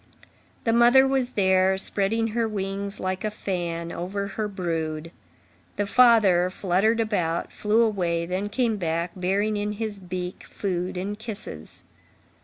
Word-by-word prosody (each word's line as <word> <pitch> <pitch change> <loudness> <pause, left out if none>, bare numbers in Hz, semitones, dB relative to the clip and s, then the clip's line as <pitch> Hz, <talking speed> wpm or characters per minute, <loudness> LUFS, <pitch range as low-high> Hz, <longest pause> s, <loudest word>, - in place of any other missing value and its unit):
The 225 - +2
mother 240 +3 +6
was 260 -2 0
there, 190 -1 +3
spreading 215 +4 +1
her 230 +1 0
wings 200 -1 -4
like 185 0 -2
a 215 - 0
fan 170 -5 -3
over 200 +3 -4
her 210 +2 -3
brood; 165 -4 -3 0.6
the 205 - 0
father 205 -6 +5
fluttered 195 +5 +1
about, 180 -7 -1
flew 215 +2 +2
away, 175 -6 0
then 185 +4 -2
came 230 0 0
back, 170 -1 -1
bearing 195 +4 0
in 205 0 -2
his 210 -1 -4
beak 180 0 -5
food 180 -2 -3
and 205 +3 -4
kisses. 215 - -7
195 Hz, 140 wpm, -25 LUFS, 180-215 Hz, 0.6 s, mother